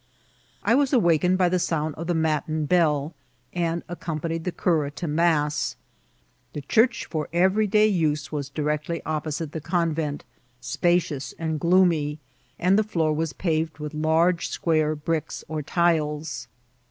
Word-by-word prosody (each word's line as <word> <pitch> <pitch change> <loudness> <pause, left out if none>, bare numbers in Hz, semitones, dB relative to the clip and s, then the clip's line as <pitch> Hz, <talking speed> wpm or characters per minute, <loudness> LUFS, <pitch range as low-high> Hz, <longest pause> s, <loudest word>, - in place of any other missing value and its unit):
I 215 - +3
was 275 +2 +2
awaked 180 - +3
by 185 -1 +3
the 180 +1 +1
sound 160 -3 -1
of 165 +3 -7
the 175 - +1
matin 155 -1 0
bell, 155 -3 +2 0.4
and 170 -1 -1
ac 175 - -6
companied 165 0 -3
the 180 - -1
cura 160 -5 +1
to 145 +4 -6
mass. 150 -1 +1 0.8
The 150 - -5
church 230 - +2
for 155 -2 -4
every 190 +5 +3
day 210 +1 +4
use 155 -7 0
was 145 -3 -3
directly 150 +3 -2
opposite 155 0 -3
the 160 - -5
convent, 160 -3 -1 0.4
spacious 150 +2 0
and 160 -2 -2
gloomy, 170 -4 +3 0.4
and 185 +4 +3
the - - +3
floor 165 -7 0
was 160 0 -2
paved 160 -2 -1
with 150 0 -6
large 160 +3 +2
square 155 -2 +1
bricks 155 +1 -3
or 155 0 -3
tiles. 150 -6 0
160 Hz, 150 wpm, -25 LUFS, 150-175 Hz, 0.8 s, day